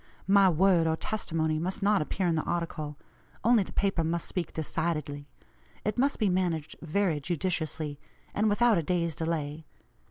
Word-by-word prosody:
My 195 0 +6
word 175 0 +4
or 160 - +2
testimony 160 -5 -1
must 185 +4 -2
not 205 -2 +4
appear 185 +5 -2
in 170 - +2
the 160 - +1
article; 155 -4 -3 0.5
only 235 -1 +5
the 190 - -5
paper 195 -4 +1
must 165 +1 -1
speak 180 -3 -3
decidedly. 150 -2 -2 0.6
It 210 +2 -1
must 275 +2 +2
be 215 - +2
managed 175 -5 0
very 165 -1 0
judiciously, 160 -2 -2 0.3
and 215 +1 +2
without 220 -1 +4
a - - +1
day's 170 0 0
delay. 160 -2 -3
170 Hz, 160 wpm, -29 LUFS, 160-195 Hz, 0.6 s, My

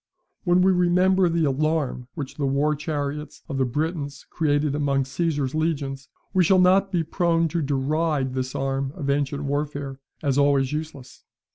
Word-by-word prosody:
When 180 0 +4
we 190 - +5
remember 180 +1 +3
the 165 -1 +1
alarm 145 -3 0
which 145 -5 -5
the 140 -2 0
war 140 +3 +2
chariots 150 -1 -4
of 140 -4 -3
the 130 - +3
Britons 145 +1 -3
created 145 -2 +1
among 140 -2 +1
Caesar's 145 -1 -1
legions, 140 -4 -2 0.2
we 185 -2 +4
shall 185 +3 +4
not 190 +2 +4
be 175 -3 +1
prone 165 0 +1
to 170 +2 -1
deride 145 0 0
this 130 0 -3
arm 135 0 -1
of 140 -6 -1
ancient 140 0 -1
warfare 145 -1 -3 0.2
as 140 -1 +2
always 140 -1 +3
useless. 150 -4 -6
145 Hz, 160 wpm, -24 LUFS, 135-165 Hz, 0.2 s, we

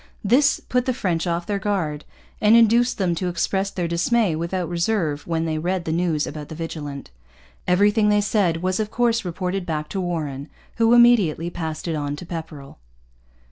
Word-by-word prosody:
This 260 +8 +3
put 250 0 -1
the 255 - 0
French 180 -7 -1
off 170 0 -1
their 205 -1 -2
guard 180 -8 -2 0.4
and 215 +2 +6
induced 235 +2 +4
them 185 -4 +1
to 180 +2 -2
express 190 +3 -1
their 180 -3 -3
dismay 175 +2 +1
without 170 +2 -2
reserve 170 -3 -1
when 165 -1 -1
they 155 -1 -2
read 180 +2 -2
the 160 - -2
news 165 -2 0
about 150 -1 -7
the 160 - -7
Vigilant. 150 - -6 0.6
Everything 205 +3 +3
they 210 - +4
said 195 -5 0
was 185 +1 0
of 215 -1 -1
course 235 0 +1
reported 180 +1 -3
back 155 -3 -4
to 195 - -3
Warren, 155 -5 -4 0.3
who 230 +1 +4
immediately 205 -9 +4
passed 160 -1 -5
it 165 - -1
on 145 -2 -3
to 165 - -9
Pepperrell. 160 - -8
175 Hz, 180 wpm, -22 LUFS, 160-205 Hz, 0.6 s, and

